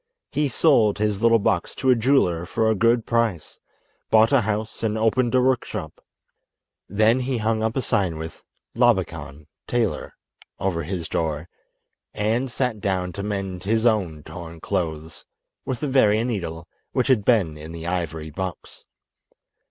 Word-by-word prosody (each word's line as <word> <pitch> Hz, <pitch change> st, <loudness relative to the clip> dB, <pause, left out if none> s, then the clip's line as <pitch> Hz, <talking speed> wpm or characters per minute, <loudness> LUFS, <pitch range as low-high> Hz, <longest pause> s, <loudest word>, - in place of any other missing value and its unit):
He 150 Hz, -1 st, 0 dB
sold 115 Hz, -6 st, +3 dB
his 105 Hz, -1 st, 0 dB
little 115 Hz, 0 st, +5 dB
box 95 Hz, -4 st, 0 dB
to 130 Hz, -1 st, +2 dB
a -, -, +6 dB
jeweller 115 Hz, -9 st, +2 dB
for 110 Hz, +6 st, 0 dB
a 110 Hz, -, +4 dB
good 115 Hz, +2 st, +2 dB
price, 115 Hz, -8 st, -1 dB, 0.5 s
bought 110 Hz, +3 st, +5 dB
a 140 Hz, -3 st, +5 dB
house 110 Hz, +1 st, -3 dB
and 110 Hz, -1 st, 0 dB
opened 115 Hz, +3 st, +2 dB
a 130 Hz, -, +5 dB
workshop. 130 Hz, -1 st, -2 dB, 0.9 s
Then 110 Hz, +5 st, +3 dB
he 130 Hz, 0 st, -1 dB
hung 110 Hz, 0 st, 0 dB
up 110 Hz, +3 st, -1 dB
a 130 Hz, -, 0 dB
sign 95 Hz, -8 st, 0 dB
with, 80 Hz, +1 st, -8 dB, 0.3 s
"Labakan, 75 Hz, +2 st, 0 dB, 0.2 s
Tailor," 120 Hz, -4 st, -1 dB, 0.4 s
over 90 Hz, -4 st, -1 dB
his 85 Hz, +1 st, -4 dB
door, 80 Hz, 0 st, -2 dB, 0.7 s
and 115 Hz, +5 st, 0 dB
sat 125 Hz, -3 st, -1 dB
down 90 Hz, -2 st, -1 dB
to 100 Hz, -, -5 dB
mend 95 Hz, -3 st, -3 dB
his 110 Hz, +2 st, +1 dB
own 90 Hz, -10 st, +1 dB
torn 85 Hz, -2 st, -9 dB
clothes 80 Hz, -4 st, -3 dB, 0.4 s
with 130 Hz, -, -3 dB
the 150 Hz, -, -1 dB
very 115 Hz, -5 st, +4 dB
needle 85 Hz, -8 st, -4 dB, 0.3 s
which -, -, +1 dB
had 130 Hz, -6 st, +3 dB
been 100 Hz, -10 st, +2 dB
in 75 Hz, +1 st, -9 dB
the 85 Hz, 0 st, -7 dB
ivory 80 Hz, -3 st, -3 dB
box. 95 Hz, +2 st, -6 dB
105 Hz, 155 wpm, -23 LUFS, 85-115 Hz, 0.9 s, a